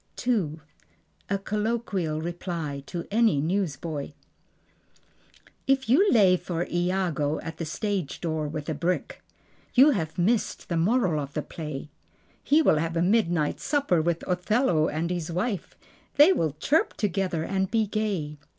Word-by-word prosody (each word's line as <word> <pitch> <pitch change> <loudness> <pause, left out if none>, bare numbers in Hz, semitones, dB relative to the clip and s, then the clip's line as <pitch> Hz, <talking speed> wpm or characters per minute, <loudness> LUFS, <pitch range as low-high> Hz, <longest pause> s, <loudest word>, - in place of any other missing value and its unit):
II. 185 -11 0 0.7
A 200 - +1
Colloquial 200 -6 -2
Reply: 170 -4 -4
To 170 -1 -5
Any 220 -8 +3
Newsboy 160 -3 -2 1.5
If 270 -1 +2
you 370 - +5
lay 195 -6 +5
for 175 -1 -3
Iago 175 -4 0
at 165 0 -7
the 165 - -4
stage 190 -1 -3
door 160 -3 -2
with 150 0 -5
a 160 - -1
brick 170 +5 -2 0.5
You 275 +4 +7
have 160 - -2
missed 210 +4 0
the 170 - -1
moral 180 -2 +2
of 140 0 -8
the 150 - -1
play. 150 -2 -7 0.5
He 310 +3 +4
will 155 - +4
have 165 +2 -1
a 165 - +2
midnight 175 -6 +1
supper 280 - +1
with 170 +1 -1
Othello 180 - +2
and 165 +3 -2
his 175 -2 -3
wife. 185 +3 -3 0.4
They 300 +6 +7
will 160 - 0
chirp 310 - +1
together 190 -5 -1
and 190 +1 -1
be 220 0 +2
gay. 195 -9 -2
175 Hz, 145 wpm, -26 LUFS, 160-210 Hz, 1.5 s, You